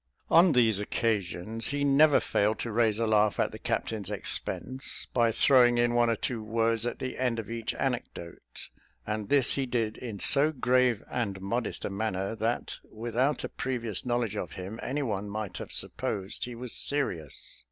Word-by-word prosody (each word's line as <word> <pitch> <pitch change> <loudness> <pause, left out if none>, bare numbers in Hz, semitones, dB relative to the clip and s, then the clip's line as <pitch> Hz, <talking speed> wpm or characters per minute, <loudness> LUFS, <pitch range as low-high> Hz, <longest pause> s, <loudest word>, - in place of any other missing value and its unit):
On 170 0 +6
these 115 -5 +3
occasions, 105 0 -2
he 145 0 -1
never 145 +2 +5
failed 105 +2 +1
to 115 - -3
raise 110 -1 +2
a 115 - +1
laugh 105 -1 +2
at - - +1
the - - -9
captain's 105 -4 -2
expense, 130 +5 -2
by 120 -2 +3
throwing 120 0 +5
in 120 0 +2
one 120 -1 +3
or 115 - +2
two 115 +1 -3
words 115 +1 0
at - - -3
the 130 -1 -5
end 125 -3 0
of 115 0 -5
each 115 -1 -3
anecdote; 120 -10 -5 0.4
and 105 -1 -3
this 140 -3 +4
he 135 -1 -1
did 115 -3 -1
in 110 -5 -6
so 145 +9 +5
grave 125 -4 +2
and 100 -6 -3
modest 115 +6 -3
a - - -3
manner, 100 -1 -2
that 115 +2 -2
without 120 +5 -1
a - - -3
previous 120 -6 -2
knowledge 120 -4 -1
of - - -4
him, 95 +4 -7
anyone 115 -7 -2
might 105 -1 -4
have - - -7
supposed 95 +1 -3
he 125 -1 -7
was 120 0 -7
serious. 110 - -2
115 Hz, 175 wpm, -29 LUFS, 105-125 Hz, 0.4 s, On